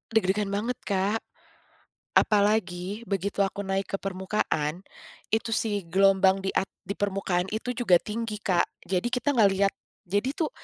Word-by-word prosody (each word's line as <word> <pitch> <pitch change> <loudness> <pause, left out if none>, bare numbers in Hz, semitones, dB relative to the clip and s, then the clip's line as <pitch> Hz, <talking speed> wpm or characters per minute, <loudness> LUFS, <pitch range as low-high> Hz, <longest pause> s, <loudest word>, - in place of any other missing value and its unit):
Deg-degan 205 0 +2
banget, 210 +5 -2
Kak. 200 +2 +1 1.0
Apalagi 205 0 +1
begitu 200 0 -2
aku 200 +1 -5
naik 195 0 -2
ke - - +4
permukaan, 185 -4 -1 0.5
itu 225 0 0
si 205 -5 -1
gelombang 190 +1 +4
di 195 - -1
at 195 - 0 0.2
di 200 +1 -6
permukaan 190 -3 0
itu 245 +3 -3
juga 230 -7 +3
tinggi, 215 -1 -4
Kak. 180 -3 +2 0.2
Jadi 180 +4 -1
kita 250 +3 0
nggak 220 -7 +5
lihat. 195 0 +2 0.3
Jadi 205 - -1
tuh, 315 -3 -1
200 Hz, 145 wpm, -27 LUFS, 190-220 Hz, 1.0 s, nggak